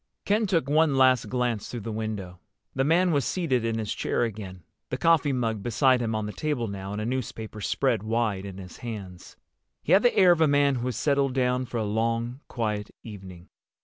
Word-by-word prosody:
Ken 210 +1 +2
took 165 -8 +1
one 150 -1 +3
last 130 -2 +4
glance 120 -4 -1
through 120 - -5
the 115 - -5
window. 105 -5 -5 0.3
The 135 - +1
man 175 +5 +3
was 145 -3 +2
seated 130 -2 0
in 115 -1 -1
his 110 -2 -2
chair - - -1
again, 95 -6 -5 0.3
the - - -2
coffee 165 -3 +3
mug 115 -5 -1
beside 125 +3 +2
him 115 -2 -1
on 110 -1 -2
the 105 - -5
table 145 -7 -2
now 100 -1 -6
and 105 - -4
a 105 - -3
newspaper 110 -3 -4
spread 120 +1 0
wide 110 -3 -1
in 100 -2 -8
his 95 -2 -10
hands. 100 -7 -8 0.5
He - - -2
had 190 +3 +7
the 245 - +2
air 185 -3 +7
of 170 -2 +2
a 160 - +6
man 145 -1 +3
who 120 +1 -3
has 125 - -2
settled 140 -3 +1
down 125 0 +1
for 120 - -4
a 110 - 0
long 115 +4 -1
quiet 105 -3 -3
evening. 95 -5 -11
120 Hz, 215 wpm, -26 LUFS, 105-140 Hz, 0.5 s, had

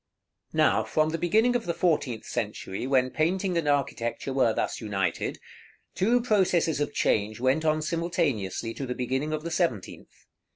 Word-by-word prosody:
§ - - -48
XXXV. - - -6
Now, - - +4
from 155 0 +1
the 165 +1 -3
beginning 220 +8 +3
of 235 -6 -1
the 170 - -1
fourteenth 145 -10 0
century, 105 -1 -4
when 130 -1 +2
painting 180 +5 0
and 165 -3 0
architecture 135 -2 -1
were 130 -4 +3
thus - - -2
united, 100 -4 -2 0.6
two 235 +6 +2
processes 185 -9 +2
of 145 - -1
change 110 -3 0
went 130 +5 +2
on 155 0 +1
simultaneously 145 - -1
to 135 - -5
the 125 - -3
beginning 130 +4 -2
of 155 0 -3
the 170 - -4
seventeenth. 160 - -3
150 Hz, 170 wpm, -27 LUFS, 120-170 Hz, 0.6 s, Now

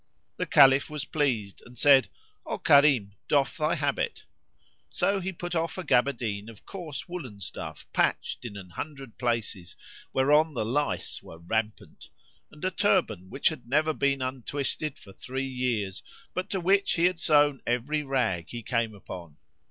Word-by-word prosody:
The - - -2
Caliph 135 +2 +6
was 150 -1 -4
pleased 120 -10 -1
and 125 0 -15
said, 135 +1 +6 0.3
"O - - -3
Karim, 140 -8 +5 0.2
doff 140 -3 +2
thy 155 +2 +1
habit." 145 -3 -1 0.7
So 200 0 +1
he 190 +1 -3
put 175 0 -6
off 165 +1 -1
a 185 - -3
gaberdine 120 -7 +1
of 110 -2 -14
coarse 170 -7 -7
woollen 140 - -7
stuff 80 -4 -7
patched - - 0
in 110 -4 -6
an 90 -3 -10
hundred 135 - -7
places 115 -7 -2 0.3
whereon 150 +3 +3
the 110 - -1
lice 145 +6 -1
were 80 - -12
rampant, 105 +6 -4 0.4
and 150 - -8
a 185 - +1
turband 165 - +1
which 135 - +2
had 155 -7 -8
never 155 +5 +2
been 140 -2 +1
untwisted 135 +3 -2
for 100 - -15
three 130 +5 -4
years 120 -7 -2 0.3
but 185 - -3
to 195 - -1
which 195 +3 +3
he 170 - +2
had 180 -1 +2
sewn 145 -3 +4
every 125 +6 0
rag 125 - -1
he 120 -1 -6
came 115 -2 -1
upon. 85 -6 -10
135 Hz, 160 wpm, -28 LUFS, 110-155 Hz, 0.7 s, Caliph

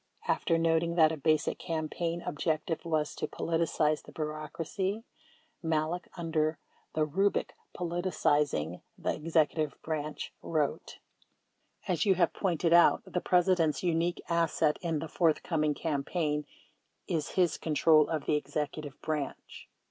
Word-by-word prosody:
37 - - +3
After 165 - +1
noting 165 0 +2
that 160 -2 +6
a - - -2
basic 155 +1 +1
campaign 165 0 -3
objective 155 +2 -2
was 155 -3 0
to - - -3
"politicize" 160 -2 0
the - - -14
bureaucracy, 160 +7 -3 0.6
Malek, 160 +1 -1
under 160 -2 0 0.4
the 155 -1 +2
rubric 195 +7 0 0.2
"Politicizing 150 - 0 0.2
the - - -1
Executive 155 -1 0
Branch," 155 -1 -4
wrote: 155 -3 -2 0.9
As 175 -3 +1
you 195 -3 +4
have 175 -2 +2
pointed 170 -3 +1
out, 170 0 +6
the 180 - -2
President's 180 -3 +2
unique 170 0 0
asset 165 -2 +1
in 165 -3 -1
the 160 +2 -4
forthcoming 155 -2 +1
campaign 150 0 -1 0.6
is 155 -3 -2
his 175 -4 +3
control 155 -1 +4
of 155 -3 -2
the 150 - +2
Executive 150 -1 -3
Branch. 150 -3 -4
160 Hz, 125 wpm, -30 LUFS, 150-170 Hz, 0.9 s, that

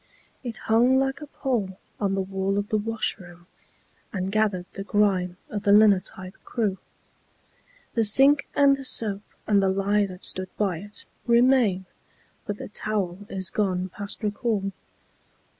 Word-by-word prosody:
It 235 -3 -5
hung 240 +4 +3
like 270 +2 0
a 300 - -7
pall 225 -10 -2 0.2
on 195 -2 0
the 195 - 0
wall 195 +1 -2
of 205 0 -2
the 215 - +2
washroom, 190 -5 -3 0.7
And 190 -1 -3
gathered 205 -4 +1
the 195 - -5
grime 195 -4 +1
of 205 - -3
the 200 - +2
linotype 200 -2 +3
crew. 210 -5 -2 1.1
The 230 - +2
sink 270 +7 +5
and 280 -1 +5
the 275 - -9
soap 210 -6 +2 0.2
and 205 -2 +3
the 195 - +2
lye 200 +2 +1
that 185 0 -11
stood 185 0 -2
by 190 -6 0
it 205 +3 -6 0.2
Remain; 235 -6 +4 0.6
but 205 - -3
the - - -8
towel 205 -4 -2
is 190 -2 -3
gone 185 -3 -1
past 200 +4 -6
recall. 210 -2 -1
205 Hz, 150 wpm, -25 LUFS, 190-225 Hz, 1.1 s, sink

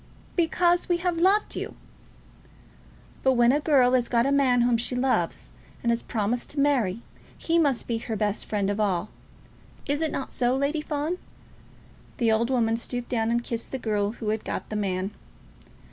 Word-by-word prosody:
"Because 345 +1 +2
we 350 - +3
have 350 -1 -1
loved 390 +4 +3
you." - - -5 1.5
"But 265 - +3
when 240 -1 +5
a 290 - +2
girl 270 -5 +4
has 245 -2 +3
got 235 0 +3
a 275 - +1
man 260 -3 +3
whom 240 0 +3
she 240 +2 -1
loves, 210 - 0 0.3
and 235 - +2
has 235 - 0
promised 225 +2 -2
to 290 - -4
marry, 240 -8 +1 0.3
he 335 0 +1
must 280 -7 +1
be 230 -1 -2
her 225 -1 -4
best 210 -1 -1
friend 205 -2 0
of 205 - -3
all. 195 -2 0 0.7
Is 290 +2 -1
it 320 - 0
not 270 - -4
so, 245 0 +1
Lady 285 +3 0
Fawn?" 305 +4 -2 1.0
The 230 -4 +2
old 225 +2 +2
woman 230 -3 +2
stooped 245 +1 -5
down 225 -3 0
and 235 0 +1
kissed 230 -1 -4
the 265 - -2
girl 210 -3 -1
who 225 -3 -4
had 215 0 -1
got - - -4
the - - -2
man. 195 -1 -1
245 Hz, 185 wpm, -26 LUFS, 220-285 Hz, 1.5 s, when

